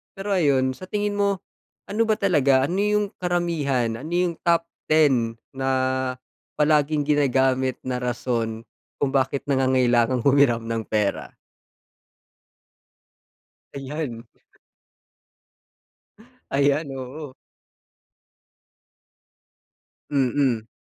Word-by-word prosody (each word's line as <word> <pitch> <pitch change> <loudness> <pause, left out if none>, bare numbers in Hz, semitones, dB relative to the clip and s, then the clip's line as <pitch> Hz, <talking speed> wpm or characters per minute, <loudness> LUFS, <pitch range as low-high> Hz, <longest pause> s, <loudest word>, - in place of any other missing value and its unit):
Pero 200 +1 -5
ayon, 140 -8 +2
sa 185 - -10
tingin 205 +1 -2
mo, 200 -2 +1 0.5
ano 215 +3 +1
ba 215 - +3
talaga, 145 -10 +3
ano 185 +3 -2
yung 210 0 +2
karamihan, 150 -10 -1
ano 155 +6 -7
yung 175 -1 +1
top 170 -1 +2 0.2
10 135 -7 +3 0.2
na 135 0 -2 0.9
palaging 150 0 +2
ginagamit 130 -3 +2
na 125 -1 -2
rason 115 -2 -2 0.4
kung 140 - +1
bakit 135 0 0
nangangailangang 130 -2 +2
humiram 140 -4 +4
ng 115 0 -3
pera? 105 -2 -2 2.4
Ayan. 135 -4 -5 2.2
Ayan, 140 +2 +1
oo. 130 +2 -8 2.7
Mm. 130 -4 +1
140 Hz, 85 wpm, -23 LUFS, 125-165 Hz, 2.7 s, humiram